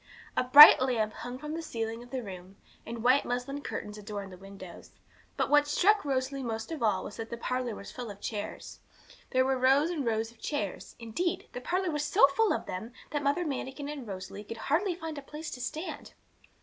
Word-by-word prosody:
A - - +2
bright 285 +3 +11
lamp 225 -5 0
hung 245 +1 -7
from 300 +3 -6
the 330 - -3
ceiling 225 -6 -4
of 245 - -13
the 260 -1 -4
room, 185 -1 -9 0.3
and 230 -1 -6
white 255 +3 +5
muslin 250 +4 -3
curtains 210 -6 -6
adorned 200 -2 -6
the - - -11
window; 195 -2 -11 0.6
but - - +1
what 295 0 +4
struck 405 +8 +3
Rosalie 270 -1 -1
most 225 +1 -4
of 315 -5 -5
all 205 -5 +1
was - - -8
that 225 0 -6
the 235 - -5
parlour 250 -1 -2
was 200 - -9
full 245 -3 -7
of 200 -1 -9
chairs. 205 -1 -6 0.5
There 260 0 +2
were 265 -1 +1
rows 275 +6 +4
and 315 -5 -2
rows 225 -1 -1
of 235 - -23
chairs; 210 -10 -4
indeed, 240 +10 -3
the 250 - -5
parlour 365 +5 -1
was 295 -1 -1
so 295 -1 +6
full 445 +8 +2
of - - -1
them 220 +6 -6 0.2
that 295 0 -1
Mother 285 +5 +1
Manikin 280 0 -4
and 285 -5 -6
Rosalie 190 +1 -7
could 230 +2 -8
hardly 345 - 0
find 320 -3 -6
a - - -9
place 300 +3 -8
to 250 - -7
stand. 315 +8 -5
255 Hz, 215 wpm, -30 LUFS, 220-295 Hz, 0.6 s, bright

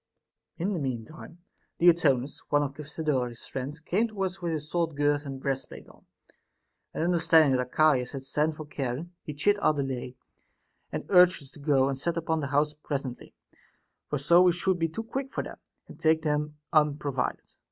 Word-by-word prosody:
In 190 +5 -1
the 175 - -2
mean 125 -5 -3
time 165 +4 -13 0.3
Diotonus, 150 -6 +3
one 145 0 +3
of 140 -1 -3
Cephisodorus's 145 -5 -2
friends, 135 +4 -5
came 195 +8 0
to 210 -3 -4
us 190 0 -3
with 170 -1 -1
his 150 -1 -4
sword 165 -1 -1
girt 145 0 +1
and 135 -1 -6
breastplate 135 0 -4
on; - - -20 0.8
and - - -2
understanding 165 -4 +4
that 125 0 -2
Archias 140 -5 +3
had 135 -1 -6
sent 150 +3 0
for 155 - -7
Charon, 145 +3 -4
he 150 - -7
chid 205 +8 +2
our 155 - +3
delay, 130 -3 -3 0.8
and - - -4
urged 180 -4 +6
us 135 - -13
to - - -14
go 140 -2 +3
and 135 -1 -2
set 170 +4 -1
upon 160 -1 0
the 140 - -2
house 145 +2 +1
presently; 140 -4 -5 0.7
for 150 - 0
so 170 +6 +5
we 180 -1 +5
should 180 +1 0
be 165 0 +1
too 225 +8 -5
quick 270 +4 -4
for - - -2
them, - - -9 0.3
and - - -13
take 160 0 +3
them 150 -1 -1 0.2
unprovided. 145 -3 0
150 Hz, 185 wpm, -28 LUFS, 140-170 Hz, 0.8 s, urged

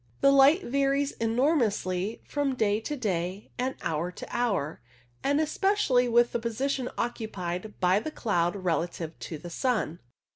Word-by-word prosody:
The 275 - +6
light 275 +7 +6
varies 275 +2 +1
enormously 225 - +1
from 285 -2 0
day 210 -3 +2
to 295 +7 -4
day, 190 -3 -2
and 260 +1 -1
hour 165 +2 -1
to - - -8
hour, 205 -11 -1 0.4
and 285 +2 +2
especially 310 -6 +2
with 240 +1 +4
the 235 - -1
position 250 +3 -1
occupied 210 -4 -4
by 185 +2 +4
the 310 - -4
cloud 175 - 0
relative 170 -3 -2
to 160 - -6
the 175 +3 -9
sun. 215 - -1
230 Hz, 145 wpm, -28 LUFS, 180-275 Hz, 0.4 s, The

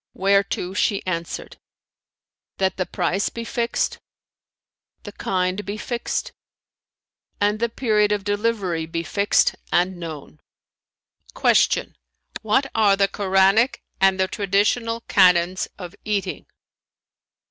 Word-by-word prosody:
whereto 195 -1 +1
she 200 0 0
answered, 170 -2 -5 1.0
"That 190 -1 0
the 185 - -1
price 195 +3 -1
be 230 - -6
fixed, 235 0 -1 1.0
the 205 - -8
kind 185 0 -1
be 205 +1 -5
fixed 240 +2 -3 1.1
and 205 +1 +1
the 235 +1 0
period 215 -3 +1
of 205 -1 0
delivery 205 -5 -1
be 165 +1 -3
fixed 200 +6 +2 0.2
and 180 +1 +1
known." 155 - -8 1.0
Q - - +3 0.5
"What 220 +6 +2
are 210 -3 +4
the 195 0 +3
Koranic 195 +5 +2 0.2
and 190 0 +3
the 190 - +2
traditional 215 +4 0
canons 180 -3 +3
of 180 -3 -8
eating?" 200 -3 -3
195 Hz, 110 wpm, -22 LUFS, 185-210 Hz, 1.1 s, are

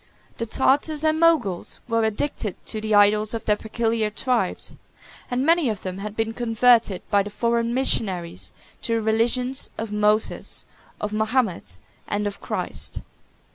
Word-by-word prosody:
The 230 - -2
Tartars 290 +6 +2
and 315 0 +2
Moguls 285 - +2
were 230 -1 +1
addicted 220 -2 -2
to 215 - -3
the 215 -1 +1
idols 210 +2 +4
of 225 - -5
their 210 - +3
peculiar 225 0 -1
tribes; 245 +3 -1 0.5
and 250 +2 0
many 330 -4 +4
of 210 -4 -4
them 185 0 -5
had 210 +1 -6
been 225 0 -1
converted 230 -4 +3
by 200 -1 +5
the 200 - -5
foreign 235 +2 0
missionaries 185 - 0 0.3
to 230 - 0
the 225 - 0
religions 240 +4 +1
of 220 -1 -4
Moses, 210 +1 +1 0.3
of 210 0 -3
Mahomet, 215 - 0 0.3
and 205 0 -1
of 205 -1 -4
Christ. - - -3
220 Hz, 150 wpm, -23 LUFS, 210-245 Hz, 0.5 s, by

